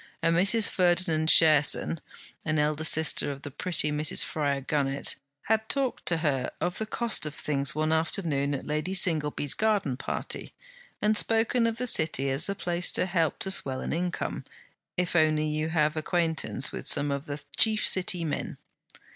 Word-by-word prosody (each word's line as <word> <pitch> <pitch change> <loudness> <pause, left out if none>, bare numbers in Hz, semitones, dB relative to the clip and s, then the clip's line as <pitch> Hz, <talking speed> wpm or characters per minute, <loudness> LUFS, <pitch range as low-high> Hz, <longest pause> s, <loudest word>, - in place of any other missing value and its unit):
A 165 - +3
Mrs. 195 +6 +4
Ferdinand 175 -3 +1
Cherson, 155 0 +5 0.4
an 155 -1 -1
elder 150 +1 0
sister 160 -2 +2
of 140 0 -9
the 145 - -7
pretty 150 0 -2
Mrs. 150 +1 +1
Fryar 140 -3 -2
Gunnett, 140 -2 0 0.3
had 220 0 -1
talked 275 -3 -2
to 165 - +3
her 135 -4 0
of 175 0 -2
the 220 - -3
cost 230 -7 0
of 150 - -7
things 140 -1 0
one 155 +1 0
afternoon 160 -3 -1
at 135 - -7
Lady 155 +5 -2
Singleby's 150 -6 +2
garden 205 -12 0
party, - - -5 0.5
and 215 +1 +3
spoken 230 +2 +2
of 230 0 -3
the 250 - -2
City 150 - +1
as 135 +2 +1
the 200 - -3
place 175 -1 -1
to - - +2
help 170 -4 0
to 190 - -2
swell 135 -7 0
an - - -3
income, 175 +2 -3 0.5
if 180 -1 -1
only 155 -2 +2
you 155 +1 -2
have 155 -1 +1
an - - -1
acquaintance 160 -5 0
with - - -7
some 145 0 +1
of 140 +2 -4
the 145 0 -6
chief 220 -1 +2
City 180 -2 +2
men. 155 -3 -4
160 Hz, 175 wpm, -27 LUFS, 150-185 Hz, 0.5 s, Cherson